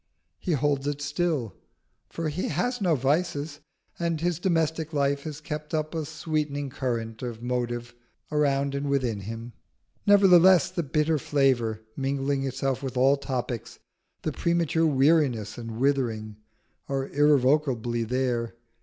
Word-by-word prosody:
He 175 - -1
holds 145 -1 +1
it 145 0 -2
still, 145 - -1 0.6
for 165 -1 -3
he 155 +5 -2
has 220 - -1
no 175 -5 +3
vices, 145 +2 0 0.4
and 170 -2 0
his 175 0 0
domestic 160 -3 0
life 140 -1 +1
has 150 -2 -5
kept 150 0 -5
up 155 +1 -2
a 160 -2 -2
sweetening 150 -2 -2
current 115 -4 -3
of 120 -2 -5
motive 120 -1 -2 0.4
around 140 -2 +1
and 140 0 -2
within 125 -6 0
him. 115 +4 -7 0.5
Nevertheless, 185 -4 +6
the 185 - -1
bitter 150 +1 +1
flavour 125 -7 +1
mingling 135 0 -1
itself 135 0 -1
with 130 -2 -4
all 135 +2 +5
topics, 125 -4 -4 0.5
the - - -1
premature 170 -1 +1
weariness 135 -7 +2
and 115 -1 -7
withering, 115 -6 0 0.5
are 135 -1 -1
irrevocably 135 -5 +2
there. 120 -1 -1
140 Hz, 135 wpm, -26 LUFS, 125-155 Hz, 0.6 s, Nevertheless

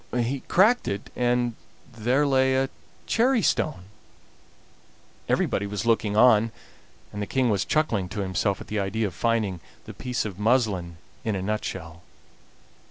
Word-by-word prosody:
He 125 +3 0
cracked 220 +7 +4
it, 100 +1 -4
and 120 -1 +1 0.4
there 125 +6 +1
lay 130 -1 +3
a 135 0 0 0.3
cherry 240 -1 +2
stone. 150 - 0 1.5
Everybody 100 - +1
was 105 +2 -4
looking 110 -2 +1
on, 115 -1 +5 0.6
and 105 - -4
the 100 - -3
King 130 -3 +1
was 100 -2 0
chuckling 115 -12 0
to 105 +2 -4
himself 95 +1 -1
at - - -9
the 105 - -3
idea 105 +3 -1
of 95 - -3
finding 110 -3 0 0.3
the - - -8
piece 125 -3 -3
of 100 -2 -6
muslin 105 -7 +1 0.3
in 110 -2 -1
a 95 - -2
nutshell. 95 -5 -4
110 Hz, 150 wpm, -25 LUFS, 100-130 Hz, 1.5 s, on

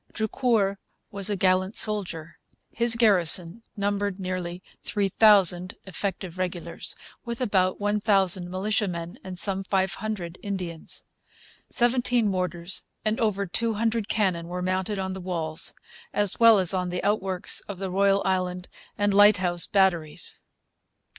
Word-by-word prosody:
Drucour 220 -3 0 0.3
was 200 0 +2
a 205 - 0
gallant 185 +1 +1
soldier. 175 -6 -1 0.3
His 235 0 +3
garrison 185 -3 +3 0.2
numbered 200 -1 -2
nearly 185 -1 -5 0.2
3,000 195 -3 +4
effective 190 -1 -5
regulars, 180 -2 -4 0.3
with 235 -1 -5
about 190 -7 +1
1,000 200 -3 +1
militiamen 185 -1 -2
and 185 -1 -8
some 195 +1 0
500 190 -1 -3
Indians. 180 -5 -6 0.7
Seventeen 245 -2 +2
mortars 180 -1 -2 0.2
and 215 +1 0
over 200 -3 0
two 225 +4 -1
hundred 225 0 -1
cannon 185 -6 0
were 180 +1 -5
mounted 185 +2 -1
on 190 -1 -3
the 190 - -7
walls, 165 -3 -2 0.4
as 205 -2 0
well 230 -2 +7
as 185 -1 +2
on 180 -1 -1
the 180 0 -4
outworks 195 -3 0
at 200 - -5
the 190 0 -5
Royal, 195 +1 +2
Island, 180 -1 -2 0.3
and 205 -1 +1
Lighthouse 190 -4 +4
Batteries. 180 -6 +1
190 Hz, 125 wpm, -25 LUFS, 180-210 Hz, 0.7 s, well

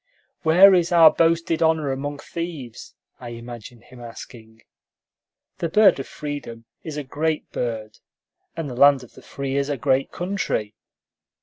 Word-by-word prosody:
"Where 180 +5 +7
is 175 -2 +2
our 165 -2 +7
boasted 165 0 +1
honor 160 -3 +2
among 145 +2 -4
thieves?" 150 -7 -8 0.2
I 120 - -8
imagined 120 0 -11
him 125 -1 -15
asking. 115 -1 -12 1.0
The 170 - -2
bird 210 -2 +5
of 135 - -6
freedom 145 -6 -7 0.2
is 155 -2 -6
a 150 - -3
great 155 +3 -3
bird, 110 -3 -5 0.6
and 165 -3 -3
the 125 - -7
land 140 0 +5
of 120 - -16
the - - -15
free 135 -1 -5
is 140 +1 -1
a 145 - -2
great 130 +1 0
country. 175 - -3
140 Hz, 150 wpm, -22 LUFS, 120-165 Hz, 1.0 s, Where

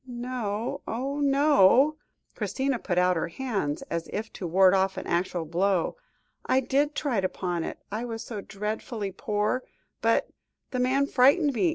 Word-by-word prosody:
"No, 245 0 -3
oh! 270 +5 -3
no," 280 -1 +5 0.4
Christina 265 -2 -1
put 175 -4 -2
out 180 0 +4
her 165 - -1
hands 195 - -3
as 170 -1 -4
if 220 +2 -4
to 180 - -5
ward 185 +2 +5
off 190 0 +1
an - - -5
actual 175 -1 -1
blow. 180 +2 +1 0.5
"I 260 - +2
did 280 +3 +1
try 250 -9 0
to 185 - 0
pawn 175 -3 -3
it. - - -5
I 220 +4 -3
was 225 -1 -5
so 220 -4 -6
dreadfully 210 +1 -4
poor, 210 +6 -1 0.4
but - - +2 0.4
the 255 - -2
man 260 +3 +2
frightened 280 +3 +4
me. 335 +8 +2
225 Hz, 165 wpm, -27 LUFS, 190-265 Hz, 0.5 s, no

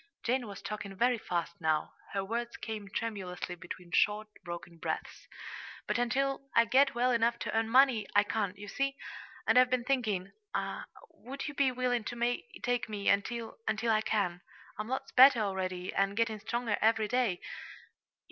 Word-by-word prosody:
Jane 245 0 0
was 200 -2 -9
talking 205 -2 -5
very 240 +3 +2
fast 170 -4 -2
now. 155 -1 +1 0.2
Her 195 -1 -1
words 235 +3 -3
came 215 -3 -5
tremulously 195 -5 -4
between 175 0 -9
short, 210 +3 +2
broken 170 -1 -7
breaths. - - -4 0.6
"But - - 0
until 275 +3 0
I 230 - +6
get 270 +2 +4
well 250 +1 +3
enough 235 0 +2
to - - -4
earn 225 0 +1
money, 250 -4 +5
I 205 - +7
can't, 205 -2 -2
you 205 +1 -9
see. 275 +5 -1 0.5
And 250 - +6
I've 255 0 +5
been 250 -1 +1
thinking; 220 -8 0 0.8
would 275 +3 -7
you 295 - -4
be 275 -2 +3
willing 250 -2 0
to 240 +1 -1 0.2
take 245 -1 0
me 205 -2 -1
until 225 +3 0
until 220 +1 +1
I 215 -1 +3
can? 200 -5 0 0.4
I'm 215 - -3
lots 265 +2 -3
better, 260 -2 +8
already, 185 -2 -2
and 195 +1 +1
getting 230 -2 +1
stronger 230 0 -1
every 220 0 +3
day. 230 -6 +1
225 Hz, 165 wpm, -31 LUFS, 200-245 Hz, 0.8 s, better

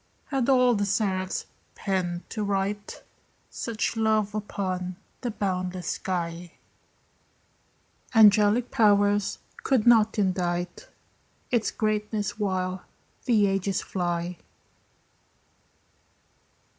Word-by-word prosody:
Had 270 -2 0
all 250 -2 +5
the 205 -2 0
seraphs 190 -2 -1 0.3
pens 180 -3 -2
to 215 - -3
write 200 +1 -2 0.5
Such 230 0 -2
love 215 -2 +1
upon 185 -3 -3 0.3
the 245 - -2
boundless 185 -4 -3
sky, 175 -2 -3 1.6
Angelic 215 +2 +5
powers 205 -2 +3 0.2
could 260 -6 +1
not 225 -3 +5
indite 180 -3 -1 0.6
Its 235 -3 +2
greatness 210 -1 -2
while 185 -2 -1 0.4
the 220 -5 +4
ages 195 -1 0
fly. 175 -1 -3
200 Hz, 85 wpm, -26 LUFS, 185-215 Hz, 1.6 s, all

